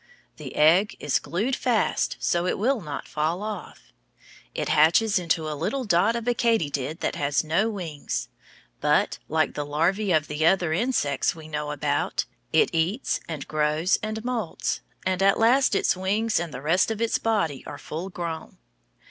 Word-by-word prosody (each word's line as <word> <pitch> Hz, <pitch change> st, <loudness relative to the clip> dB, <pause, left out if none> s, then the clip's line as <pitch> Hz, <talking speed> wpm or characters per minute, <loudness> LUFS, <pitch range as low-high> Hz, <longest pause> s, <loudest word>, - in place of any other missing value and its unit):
The -, -, -8 dB
egg 170 Hz, +7 st, +4 dB
is 145 Hz, -, +1 dB
glued 220 Hz, +10 st, -1 dB
fast 235 Hz, -4 st, 0 dB
so 175 Hz, +1 st, 0 dB
it -, -, 0 dB
will 245 Hz, +3 st, +1 dB
not 150 Hz, -4 st, -6 dB
fall 160 Hz, +6 st, -1 dB
off. 200 Hz, -, -7 dB, 0.6 s
It -, -, -2 dB
hatches 185 Hz, +7 st, +4 dB
into 165 Hz, -2 st, 0 dB
a 155 Hz, -, -2 dB
little 175 Hz, -, -2 dB
dot 200 Hz, +2 st, +3 dB
of 235 Hz, 0 st, -4 dB
a 245 Hz, -, +3 dB
katydid 160 Hz, -, 0 dB
that -, -, 0 dB
has 140 Hz, +1 st, +1 dB
no 170 Hz, +8 st, +1 dB
wings, 170 Hz, -9 st, -4 dB, 0.5 s
but, -, -, +2 dB
like -, -, +1 dB
the 145 Hz, -, -3 dB
larvæ 170 Hz, +6 st, +1 dB
of 155 Hz, -, -4 dB
the 150 Hz, +1 st, -2 dB
other 175 Hz, -1 st, +3 dB
insects 165 Hz, -, 0 dB
we 160 Hz, -1 st, -11 dB
know 150 Hz, -1 st, -3 dB
about, 145 Hz, 0 st, -1 dB, 0.3 s
it -, -, +3 dB
eats 170 Hz, +10 st, 0 dB
and 155 Hz, -4 st, -5 dB
grows 155 Hz, +3 st, +1 dB
and 215 Hz, +1 st, -4 dB
moults, 240 Hz, -8 st, -2 dB, 0.2 s
and 185 Hz, 0 st, 0 dB
at 195 Hz, 0 st, +4 dB
last 240 Hz, +1 st, +4 dB
its -, -, +2 dB
wings 205 Hz, +4 st, 0 dB
and 170 Hz, -2 st, -4 dB
the 135 Hz, 0 st, -7 dB
rest 170 Hz, +7 st, +3 dB
of 220 Hz, -1 st, -3 dB
its 230 Hz, 0 st, +1 dB
body 185 Hz, -12 st, 0 dB
are 145 Hz, -, -7 dB
full 160 Hz, +6 st, -6 dB
grown. 170 Hz, -3 st, -6 dB
175 Hz, 175 wpm, -25 LUFS, 155-215 Hz, 0.6 s, egg